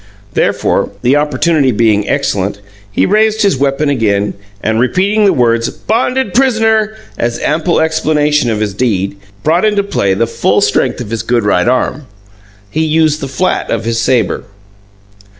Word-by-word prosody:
Therefore, - - 0
the 125 +3 +3
opportunity 150 -1 +1
being 105 -2 +1
excellent, 100 +1 -1 0.3
he - - +1
raised 215 +2 +2
his 200 -7 +3
weapon 140 +2 0
again, 105 -7 0 0.3
and, 110 +1 0
repeating 195 - +2
the 195 - +5
words 115 -2 +1
"bonded 250 +4 -1
pris'ner" 225 -4 +2 0.2
as 120 0 -1
ample 160 +3 +1
explanation 150 -3 +1
of 110 -1 -1
his 105 -2 -1
deed, 100 -4 -1 0.3
brought 165 +5 +2
into 210 -2 +2
play 100 - 0
the 115 - +1
full 115 - 0
strength - - 0
of 110 -3 -7
his 115 -2 -2
good 115 0 0
right 95 -2 +1
arm. 130 +2 -1 0.6
He 160 - 0
used 155 -1 +1
the 135 - -3
flat 160 +8 -1
of - - -1
the 115 +1 -1
sabre. 115 -3 0
140 Hz, 155 wpm, -13 LUFS, 115-180 Hz, 0.6 s, the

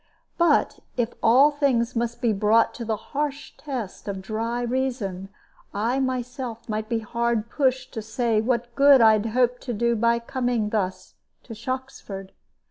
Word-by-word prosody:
But 340 - +3 0.2
if 240 -1 0
all 260 +6 +6
things 255 -5 +1
must 235 +1 -2
be 230 -2 +3
brought 215 +3 +3
to 240 - -6
the 220 -1 -1
harsh 285 +6 -4
test 250 -12 -6
of 195 -1 -3
dry 225 +5 -3
reason, 240 -7 -2 0.5
I 230 +6 0
myself 250 -2 -3
might 215 0 -3
be 230 - +1
hard 235 0 -1
pushed 260 -3 0
to 225 - -4
say 220 0 0
what 240 0 -1
good 280 +1 +7
I 220 -2 +6
hoped 245 +3 +1
to 245 - -4
do 235 +2 +1
by 235 +1 +3
coming 240 -2 -1
thus 190 -4 -2 0.3
to 230 - -9
Shoxford. 235 -5 -6
235 Hz, 155 wpm, -24 LUFS, 220-255 Hz, 0.5 s, good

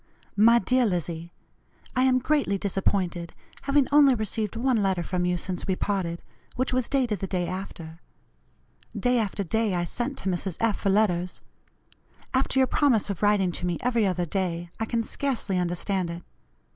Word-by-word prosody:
"MY 230 +3 +6
DEAR 250 +3 +2
LIZZIE: 170 -2 -3 0.6
I 255 - +3
am 255 -1 +4
greatly 260 -6 +1
disappointed, 185 -3 -1 0.3
having 280 0 +3
only 285 -3 +6
received 215 -1 -2
one 250 +1 +1
letter 190 -3 +1
from 180 0 -1
you 180 0 +1
since 180 +1 -4
we 190 - +1
parted, 185 -4 -2 0.3
which 255 +1 -1
was 255 -1 0
dated 250 -8 +1
the 195 - -3
day 180 -2 -1
after. 170 -3 -7 1.0
Day 245 -1 +2
after 205 -2 -1
day 215 +1 0
I 175 - 0
sent 245 - -3
to - - -5
Mrs. 180 0 -2
F. 225 -3 +1
for 195 - 0
letters. 185 -3 +1 0.9
After 265 +1 +1
your 260 - +6
promise 250 -7 +2
of 195 - -6
writing 205 -3 +3
to 180 - -4
me 175 -2 -1
every 235 -4 +2
other 180 -1 0
day, 175 -1 -2
I 220 - 0
can 230 0 -1
scarcely 225 -7 -1
understand 180 +1 -1
it. 170 +1 -6
200 Hz, 170 wpm, -26 LUFS, 180-240 Hz, 1.0 s, MY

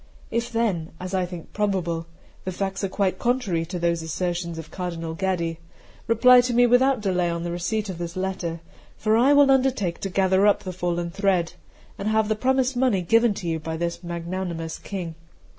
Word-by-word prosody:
If 235 +1 -1
then, 205 -9 -1
as 185 +1 -6
I 185 -1 +1
think 175 -2 -9
probable, 180 -5 -1 0.4
the 185 - -3
facts 195 +1 -3
are 195 - 0
quite 190 -1 0
contrary 225 -10 0
to 180 +1 -4
those 170 -1 0
assertions 170 +1 -3
of 160 -1 -8
Cardinal 170 -3 -4
Gaddi, 170 -2 -1 0.5
reply 250 +2 +7
to 245 -1 -1
me 245 +1 +6
without 250 0 +4
delay 180 -3 +1
upon 170 0 -3
the 170 - -3
receipt 205 +5 -2
of 185 -3 -6
this 170 0 -5
letter; 185 -3 -3 0.4
for 215 0 +2
I 250 +5 +5
will 285 -1 +6
undertake 255 -10 +1
to 195 - -3
gather 190 +1 +3
up 205 - +3
the 185 - -5
fallen 175 -1 -2
thread, 185 -3 +1 0.5
and 200 - -3
have 220 0 +2
the 215 - +2
promised 260 +3 +1
money 245 -7 +2
given 225 +3 +3
you 165 -2 -1
by 160 +1 -4
this 170 0 -3
magnanimous 170 -1 -4
King."' 180 -5 -5
185 Hz, 190 wpm, -24 LUFS, 170-220 Hz, 0.5 s, reply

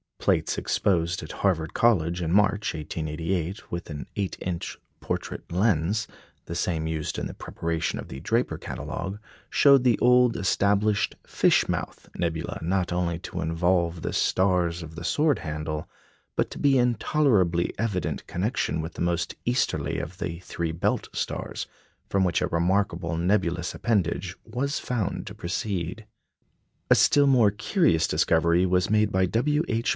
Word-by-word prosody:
Plates - - +1
exposed 85 -3 0
at 75 - -7
Harvard 80 -5 0
College 90 -7 +2
in 80 -1 -1
March, 105 +2 +2
1888, 80 +5 -3
with 85 0 -5
an 75 -2 -6
8 100 -2 -2
inch 90 -2 -4 0.2
portrait - - -5
lens 100 +2 +1 0.4
(the - - -6
same 85 -2 -1
used 80 -1 -3
in - - -2
the - - -5
preparation 85 -1 -3
of - - -6
the 65 - -7
Draper - - 0
Catalogue) 95 +3 -5 0.3
showed 140 -3 +6
the 125 -3 +4
old 125 -1 +5
established 100 +2 +2
"Fish - - +3
mouth" - - -4
nebula 80 -2 -2
not 90 +2 0
only 85 -1 0
to 90 -1 -5
involve 85 +1 +1
the - - -2
stars 90 -3 +1
of 80 0 -10
the 85 - -7
sword 150 - +2
handle, 75 -1 -4 0.5
but - - +1
to - - -7
be 140 -2 +4
in 120 -1 +3
tolerably 100 - +2
evident 100 -7 -2
connection 95 -3 -1
with 80 +1 -6
the - - -7
most 85 0 0
easterly 120 +1 0
of 85 +3 -7
the 85 -2 -4
three 85 -2 -3
belt 80 +2 -1
stars, - - -3 0.4
from 100 -1 +2
which 90 -2 +1
a - - +1
remarkable 85 -1 0
nebulous 90 -1 0
appendage 95 -5 0
was 130 +6 -2
found 115 -7 -2
to - - -6
proceed. 90 +2 -3 0.9
A - - +9
still 145 -1 +5
more 120 -6 +5
curious 105 - +2
discovery 85 +2 +3
was 90 -1 +2
made 105 0 +3
by 95 -1 +3
W. 145 - +1
H. 115 0 0
90 Hz, 155 wpm, -26 LUFS, 85-105 Hz, 0.9 s, A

